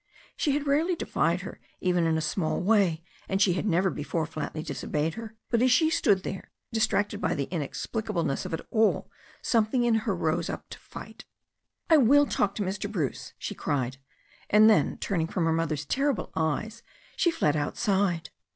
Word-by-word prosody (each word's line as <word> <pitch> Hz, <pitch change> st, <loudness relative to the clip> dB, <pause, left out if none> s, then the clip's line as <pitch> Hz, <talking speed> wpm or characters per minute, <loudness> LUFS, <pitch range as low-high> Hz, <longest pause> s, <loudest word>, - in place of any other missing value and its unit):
She 290 Hz, -, +1 dB
had 290 Hz, 0 st, -1 dB
rarely 310 Hz, +6 st, +2 dB
defied -, -, 0 dB
her -, -, -8 dB, 0.2 s
even 180 Hz, -2 st, +1 dB
in 160 Hz, 0 st, +2 dB
a -, -, -1 dB
small 155 Hz, +1 st, -1 dB
way, 185 Hz, -5 st, +2 dB, 0.3 s
and 190 Hz, -, 0 dB
she 190 Hz, -2 st, +4 dB
had 185 Hz, +4 st, -2 dB
never 185 Hz, 0 st, +2 dB
before 155 Hz, +2 st, -2 dB
flatly 155 Hz, -1 st, -5 dB
disobeyed 155 Hz, 0 st, -2 dB
her, 225 Hz, +1 st, -8 dB, 0.2 s
but 235 Hz, -1 st, +3 dB
as 255 Hz, 0 st, +4 dB
she 315 Hz, +5 st, +4 dB
stood 195 Hz, -, +2 dB
there 190 Hz, -, -6 dB, 0.2 s
distracted 220 Hz, -2 st, +1 dB
by -, -, 0 dB
the 140 Hz, -2 st, -1 dB
inexplicableness 175 Hz, -, -2 dB
of -, -, -6 dB
it -, -, -9 dB
all, 220 Hz, -1 st, +2 dB, 0.3 s
something 230 Hz, +2 st, +2 dB
in 240 Hz, -1 st, +3 dB, 0.2 s
her -, -, +1 dB
rose -, -, -1 dB
up -, -, -6 dB
to -, -, -8 dB
fight. -, -, -11 dB, 0.6 s
"I 320 Hz, -, +6 dB
will 285 Hz, +2 st, +6 dB
talk 200 Hz, -7 st, 0 dB
to 210 Hz, -, -1 dB
Mr. 200 Hz, +2 st, -3 dB
Bruce,*' 160 Hz, -10 st, -3 dB
she -, -, -5 dB
cried, 130 Hz, -2 st, -2 dB, 0.5 s
and 215 Hz, +1 st, +7 dB
then, 220 Hz, -, +3 dB
turning 170 Hz, -5 st, -1 dB
from 170 Hz, 0 st, -1 dB
her 165 Hz, -, +2 dB
mother's 155 Hz, -2 st, -1 dB
terrible 275 Hz, -, 0 dB
eyes, 210 Hz, +9 st, -1 dB, 0.3 s
she 350 Hz, -, +3 dB
fled 155 Hz, -, +1 dB
outside. 180 Hz, +3 st, 0 dB
195 Hz, 180 wpm, -27 LUFS, 160-225 Hz, 0.6 s, and